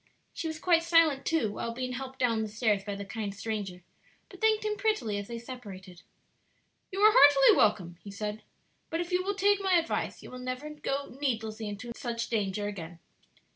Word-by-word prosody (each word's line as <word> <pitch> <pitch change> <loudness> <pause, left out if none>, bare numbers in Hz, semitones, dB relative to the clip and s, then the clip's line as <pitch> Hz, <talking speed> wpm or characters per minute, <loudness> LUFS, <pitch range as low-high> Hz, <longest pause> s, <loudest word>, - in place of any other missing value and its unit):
She 330 - -4
was 315 -1 -4
quite 335 0 +3
silent, 330 -4 +3
too, 315 -11 +1
while 230 +2 -4
being 255 0 -3
helped 265 +1 -6
down 230 -4 +1
the 220 - -2
stairs 210 -2 0
by 200 0 -4
the 200 0 -6
kind 205 -1 -4
stranger, 200 -4 -4 0.5
but - - -14
thanked 435 -1 +3
him 425 0 0
prettily 395 - 0
as 205 - -7
they 235 - -5
separated. 200 -8 -10 0.9
"You 390 +1 -3
are 430 +1 +7
heartily 285 - +8
welcome," 180 -5 +2
he 205 - -9
said; 210 +2 -4 0.5
"but 330 - -2
if 350 +1 -3
you 360 0 +2
will 400 +1 -1
take 405 +1 +3
my 380 -2 +3
advice 330 -1 -1
you - - -10
will 255 - -8
never 255 +4 -5
go 280 -3 -4
needlessly 220 -5 -2
into 205 +4 -7
such 235 -1 -3
danger 205 -2 -1
again." 175 -4 -7
240 Hz, 195 wpm, -29 LUFS, 205-325 Hz, 0.9 s, heartily